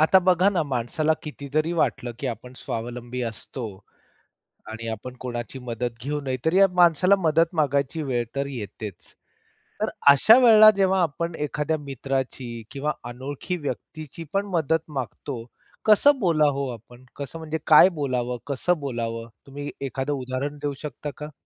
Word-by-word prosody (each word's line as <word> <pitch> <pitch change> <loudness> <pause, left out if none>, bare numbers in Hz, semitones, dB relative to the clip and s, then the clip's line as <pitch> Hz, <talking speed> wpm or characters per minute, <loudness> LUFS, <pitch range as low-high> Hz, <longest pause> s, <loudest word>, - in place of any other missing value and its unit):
आता 160 +5 +6
बघा 185 +1 +4
ना, 180 -5 +1
माणसाला 140 +3 0
कितीतरी 150 +2 -2
वाटलं, 125 -7 0
की 140 - -3
आपण 125 +1 -5
स्वावलंबी 120 +2 -5
असतो 115 +2 -6 1.1
आणि 115 +1 -6
आपण 120 +3 -6
कोणाची 120 0 -5
मदत 120 -1 -3
घेऊ 150 +2 -2
नयेत, 130 -2 -3
तरी 160 +3 +3
या 195 - +7
माणसाला 180 +2 +5
मदत 165 -1 +2
मागायची 145 0 +1
वेळ 125 -4 0
तर 140 0 0
येतेच. 105 -6 -8 0.7
तर - - +1 0.2
अशा 215 - +7
वेळेला 220 -3 +9
जेव्हा 190 -1 +3
आपण 170 +1 -1
एखाद्या 150 +1 -1
मित्राची 135 -4 -4
किंवा 145 +2 -1 0.2
अनोळखी 140 +8 -5
व्यक्तीची 155 0 -6
पण 195 +1 +1
मदत 160 0 +1
मागतो, 125 0 -5 0.4
कसं 265 +7 +6
बोला 165 -7 +3
हो 140 -1 -1
आपण? 120 +2 -14
कसं 140 +3 -7
म्हणजे 160 0 -3
काय 155 +4 +8
बोलावं, 125 -7 -2
कसं 155 +5 0
बोलावं? 115 -4 -4 0.2
तुम्ही 145 +1 -6
एखादं 135 +1 -2
उदाहरण 130 +2 -3
देऊ 145 -1 -1
शकता 150 0 -5
का? 150 0 -7
140 Hz, 150 wpm, -24 LUFS, 125-160 Hz, 1.1 s, वेळेला